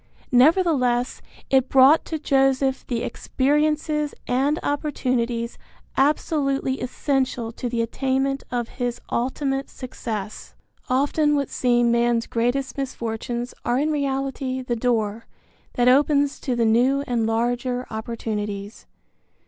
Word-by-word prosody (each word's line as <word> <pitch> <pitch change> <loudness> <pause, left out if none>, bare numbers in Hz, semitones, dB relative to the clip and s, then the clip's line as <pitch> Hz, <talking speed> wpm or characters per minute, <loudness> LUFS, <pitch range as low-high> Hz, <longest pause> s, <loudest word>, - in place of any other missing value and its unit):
Nevertheless 255 -3 +3 0.3
it 265 -1 +3
brought 270 +4 +6
to 320 - -3
Joseph 270 -2 +1
the 235 -2 -2
experiences 300 +2 0
and 270 +5 +1
opportunities 250 -5 -1 0.4
absolutely 275 -1 +1
essential 255 -2 -1
to 245 +1 -4
the 230 -1 0
attainment 270 +3 -1
of 240 -2 -2
his 245 -1 -1
ultimate 270 +2 -1
success. 220 -5 -6 0.3
Often 290 +3 +2
what 280 -2 -1
seem 240 -1 +2
man's 235 -1 +2
greatest 245 +4 -1
misfortunes 240 -1 -4
are 240 +1 +1
in 300 +3 +1
reality 270 -2 -2
the 245 -1 -2
door 225 -2 -1 0.5
that 245 0 +2
opens 285 +2 +3
to 255 -4 -2
the 235 -1 +2
new 250 +5 +3
and 235 -4 0
larger 245 +2 -1
opportunities. 215 -2 -5
255 Hz, 115 wpm, -23 LUFS, 235-275 Hz, 0.5 s, brought